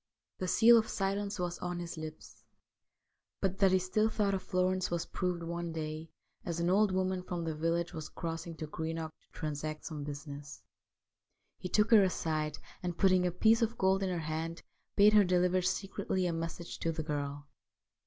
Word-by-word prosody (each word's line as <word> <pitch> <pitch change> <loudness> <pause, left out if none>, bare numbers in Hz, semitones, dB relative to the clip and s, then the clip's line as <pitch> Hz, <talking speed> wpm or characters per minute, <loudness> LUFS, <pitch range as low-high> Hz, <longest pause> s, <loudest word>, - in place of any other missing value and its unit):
The 185 - -2
seal 230 +4 +7
of 220 - -2
silence 200 +1 -1
was 175 -1 -3
on 175 0 -3
his 175 -1 -5
lips. 155 -1 -9 1.0
But 195 -1 -1
that 195 -2 +5
he 185 - +5
still 200 +4 +1
thought 205 -2 +1
of 190 - -1
Florence 185 0 0
was 170 -1 -1
proved 180 -2 -2
one 170 0 -3
day 155 0 -5 0.3
as 170 -1 -3
an 170 +1 +2
old 205 +1 +4
woman 185 0 0
from 175 -2 -4
the 165 -1 -2
village 165 +2 -1
was 155 -2 -6
crossing 165 0 -5
to 155 - -4
Greenock 160 +1 -4
to - - -38
transact 155 0 -4
some 150 -3 -5
business. 145 0 -7 1.0
He 185 - -5
took 210 +4 +3
her 220 -3 +9
aside, 155 -5 0 0.2
and, 175 -1 -3
putting 185 -2 +4
a - - 0
piece 220 +6 +4
of 230 0 0
gold 190 0 +3
in 190 - 0
her 180 - -1
hand, 160 +2 -3 0.3
bade 210 +1 +7
her 210 -1 +7
deliver 180 0 +3
secretly 190 0 -1
a 175 - 0
message 165 +1 -5
to 165 - 0
the 160 -1 -3
girl. 145 -1 -3
175 Hz, 185 wpm, -32 LUFS, 160-190 Hz, 1.0 s, her